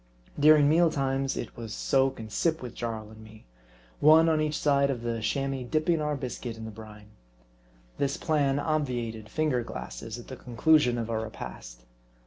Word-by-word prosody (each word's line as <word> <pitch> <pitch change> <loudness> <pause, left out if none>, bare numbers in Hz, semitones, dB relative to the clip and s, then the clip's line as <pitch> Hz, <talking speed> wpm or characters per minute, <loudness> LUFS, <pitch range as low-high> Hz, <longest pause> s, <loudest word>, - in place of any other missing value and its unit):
During 150 0 +6
meal 165 +3 +4
times 135 -2 -1
it 115 - -5
was 115 -2 -7
soak 135 -1 +1
and 110 -1 -8
sip 160 +1 0
with 120 -2 -7
Jarl 110 -2 -5
and 110 0 -13
me: 110 0 -15 0.5
one 160 +2 +6
on 155 -1 +2
each 155 -1 -1
side 140 -1 +2
of 125 -4 -3
the 115 -1 -2
Chamois 135 +4 -1
dipping 155 +1 +1
our 150 0 -1
biscuit 125 -3 -5
in 110 - -7
the 110 - -6
brine. 105 -1 -12 0.9
This 140 0 0
plan 145 -4 +1
obviated 125 -8 -2
finger 155 -6 0
glasses 65 - -7
at 120 - -11
the 130 - -7
conclusion 125 +1 +2
of 115 -1 -3
our 110 -1 -1
repast. - - -8
130 Hz, 175 wpm, -28 LUFS, 110-150 Hz, 0.9 s, During